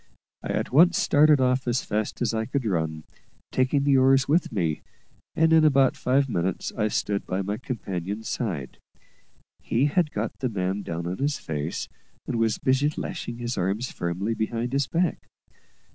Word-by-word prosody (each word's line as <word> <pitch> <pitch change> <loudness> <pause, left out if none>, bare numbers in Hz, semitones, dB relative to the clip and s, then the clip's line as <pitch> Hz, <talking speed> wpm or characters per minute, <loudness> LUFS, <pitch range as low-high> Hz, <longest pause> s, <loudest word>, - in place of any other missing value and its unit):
I - - -6
at - - -1
once 175 +7 +6
started 150 0 +5
off 130 0 +1
as 120 +2 +1
fast 105 +3 -2
as 115 - 0
I 110 0 -1
could 135 -2 -2
run, 80 -6 -1 0.5
taking 130 +2 +1
the 140 -1 +4
oars 135 0 +4
with 165 +5 +2
me, 85 -8 -1 0.5
and 160 0 +4
in 160 -1 +6
about 135 -3 +4
five 135 +2 +1
minutes 90 -5 -2
I 105 -1 +1
stood 100 -1 -1
by 95 +2 -1
my 100 +2 -3
companion's 105 -4 -5
side. 85 - -4 0.8
He 125 +5 +1
had 155 +2 +2
got - - -4
the 130 - -1
man 95 -1 -2
down 85 -3 -5
on 90 +2 -4
his 145 +1 0
face, 75 0 -4 0.4
and - - -2
was 115 -1 +1
busy 135 +3 +2
lashing 120 - -5
his 120 -2 -3
arms 100 +7 -1
firmly 90 +6 -2
behind 115 +3 -2
his 140 -1 +1
back. 170 0 -1
120 Hz, 175 wpm, -25 LUFS, 95-135 Hz, 0.8 s, once